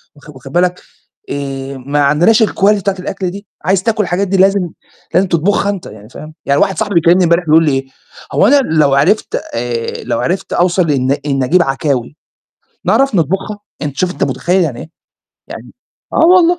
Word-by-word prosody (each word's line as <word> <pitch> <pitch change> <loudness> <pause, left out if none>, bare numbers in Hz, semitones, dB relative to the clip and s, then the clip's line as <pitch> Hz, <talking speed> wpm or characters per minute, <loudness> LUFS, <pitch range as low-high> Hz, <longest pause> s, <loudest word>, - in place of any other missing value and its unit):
واخ 145 +1 -17
واخد 135 -2 -12
بالك، 180 +2 0 0.5
آآ 135 -1 -5
ما 140 +3 -2
عندناش 175 - +4
الquality 205 0 +2
بتاعة 200 0 -1
الأكل 185 0 -4
دي، 200 +2 -10 0.2
عايز 190 0 +1
تاكل 220 0 +1
الحاجات 185 +2 -1
دي 195 +1 0
لازم 190 -1 +3 0.4
لازم 185 +3 +3
تطبخها 185 +4 +1
أنت 200 -3 -4
يعني 105 0 -12
فاهم، 155 +4 -11
يعني 140 0 +2
واحد 190 - +1
صاحبي 205 -3 -2
بيكلّمني 170 +2 +4
امبارح 170 +1 +2
بيقول 160 +1 +4
لي 150 - +2
إيه: 135 0 -1 0.5
"هو - - +3
أنا 285 - +5
لو 155 - +2
عرفت 165 +11 +1 0.2
آآ 115 0 -3
لو - - -2
عرفت 185 +2 -2
أوصل 175 -2 +2
إن 130 -2 0
إن 135 -2 0
أجيب 175 +8 +3
عكاوي، 135 -2 -2 0.7
نعرف 275 -4 +2
نطبخها؟" 195 +5 -1 0.2
أنت 145 -3 -4
شُفت 180 -1 0
أنت - - -2
متخيّل 180 +2 0
يعني 135 -8 -3
إيه؟ - - -9 0.6
يعني - - -10 0.4
آه - - +4
والله، 350 0 +3
175 Hz, 185 wpm, -14 LUFS, 140-195 Hz, 0.7 s, أنا